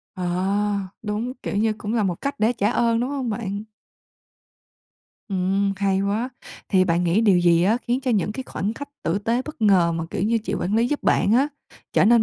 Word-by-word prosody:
Ờ, 185 - -4 0.8
đúng, 220 +3 -2
kiểu - - -3
như, 220 +1 +2
cũng 210 +2 -3
là 225 - +2
một 185 -3 0
cách 280 +1 -2
để 220 +3 +3
trả 215 -3 0
ơn, 230 -1 +2
đúng 250 +3 -1
hông 270 -4 -2
bạn? 205 -1 -4 1.6
Ừm, 195 +1 +1
hay 195 -1 +1
quá. 205 +5 -1 0.4
Thì 185 -2 +4
bạn 175 0 +1
nghĩ 175 +5 +3
điều 200 -5 +4
gì 170 -1 +4
á 205 +5 +3
khiến 245 +2 +1
cho 260 -2 -1
những 210 -2 +1
cái 265 - -5
khoảnh 205 +4 -3
khách 285 +4 -7
tử 165 +4 0
tế 230 +4 0
bất 305 -4 -9
ngờ 185 -5 +4
mà, 165 0 -2
kiểu - - -2
như, 225 +3 +2
chị 210 -2 -4
quản 195 +1 -1
lý 230 +2 +3
giúp 295 - -2
bạn 200 - +3
á 265 +5 +4 0.4
trở - - +4
nên 235 +1 +5
210 Hz, 215 wpm, -23 LUFS, 190-235 Hz, 1.6 s, nên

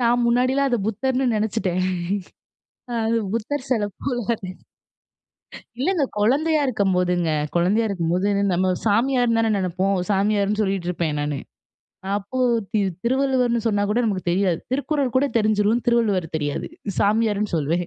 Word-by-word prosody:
நான் 240 0 +2
முன்னாடிலாம் 255 +3 +2
அத 245 - +1
புத்தர்ன்னு 255 +4 0
நினச்சுட்டேன். 200 -4 -1 1.2
அது 225 +1 +1 0.2
புத்தர் 250 +5 -3
சில 225 -5 +2 0.2
போல, 240 -4 -1 1.4
இல்லங்க, 330 +4 +1 0.2
கொழந்தயா 295 +9 +2
இருக்கும்போதுங்க. 180 -6 +1 0.3
கொழந்தயா 200 +6 +2
இருக்கும்போது 180 0 0 0.3
நம்ம 185 +2 +1 0.2
சாமியார்னு 235 +2 +2
தானே 225 -1 +1
நெனப்போம். 190 +1 0
சாமியார்ன்னு 205 +1 +1
சொல்லிட்டு 195 -3 -1
இருப்பேன் 165 -4 -2
நானு. 145 -1 -2 0.8
அப்போ 205 +6 -5 0.3
தி 215 - +2 0.2
திருவள்ளுவர்ன்னு 255 -2 +1
சொன்னா 205 -2 +1
கூட 210 +3 +1
நமக்கு 195 -5 -1
தெரியாது. 180 -2 +1
திருக்குறள் 280 -2 -1
கூட 265 - +4
தெரிஞ்சுரும், 215 +2 +2
திருவள்ளுவர் 220 -7 +2
தெரியாது, 145 -2 -3 0.3
சாமியார்ன்னு 210 -1 +1
சொல்லுவேன். 165 +4 0
215 Hz, 120 wpm, -22 LUFS, 190-245 Hz, 1.4 s, கூட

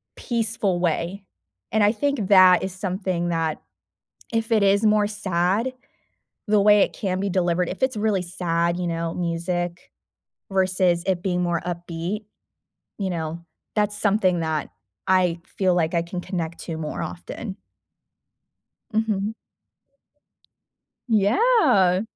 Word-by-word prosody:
peaceful 225 -6 -1
way, 175 +3 -1 0.5
and 220 0 +3
I 205 - +5
think 280 -4 -1
that 185 -3 +7
is 190 - -3
something 185 -2 -2
that 165 -2 -1 0.7
if 225 +1 -1
it 215 -2 +4
is 200 +2 +3
more 210 -1 +4
sad, 205 +3 0 0.8
the 210 -1 +3
way 210 0 +6
it - - +1
can 185 -2 -2
be 200 - -1
delivered, 175 -1 +1
if 185 - -7
it's 260 -2 +1
really 210 -3 +1
sad, 170 -1 -1
you 180 - -2
know, 165 -1 -2
music 175 0 -3 0.6
versus 185 -2 +2
it 185 -2 +1
being 180 -2 0
more 175 -1 0
upbeat, 175 +4 -4 0.7
you 195 -2 -1
know, 165 -1 -4 0.3
that's 210 -1 +1
something 195 -4 +2
that 160 -2 -2 0.4
I 180 -2 +3
feel 185 -2 0
like 165 -2 +1
I 170 - +2
can 175 +1 -5
connect 170 -3 -4
to 165 - -4
more 155 -1 -4
often. 195 +3 -6 1.4
Mhm. 215 -1 0 1.7
Yeah. 220 - +4
185 Hz, 130 wpm, -23 LUFS, 175-210 Hz, 1.7 s, that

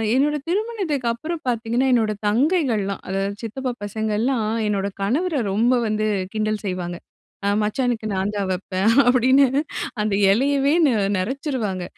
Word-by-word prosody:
என்னோட 290 +3 +2
திருமணத்துக்கப்புறம் 335 - -2
பாத்தீங்கன்னா, 235 +3 0
என்னோட 220 -3 +2
தங்கைகள்லாம், 230 - +1
அதாவது 195 +1 -2
சித்தப்பா 250 +3 -3
பசங்க 215 +1 -3
எல்லாம் 235 -2 0 0.2
என்னோட 200 -1 0
கணவர 300 - 0 0.2
ரொம்ப 235 +5 +3
வந்து 215 0 0 0.3
கிண்டல் 215 0 -1
செய்வாங்க. 180 -2 -3 0.5
அ 200 - +2
"மச்சானுக்கு 225 0 -1
நான் 190 +2 -1
தான் 195 -2 -1
வப்பேன்" 185 +2 -1 0.2
அப்டின்னு, 260 +2 +5 0.5
அந்த 210 -1 0 0.2
எலையவே 275 +5 +2
நெ - - +3 0.3
நெறச்சிருவாங்க. 225 - -2
230 Hz, 125 wpm, -22 LUFS, 205-270 Hz, 0.5 s, அப்டின்னு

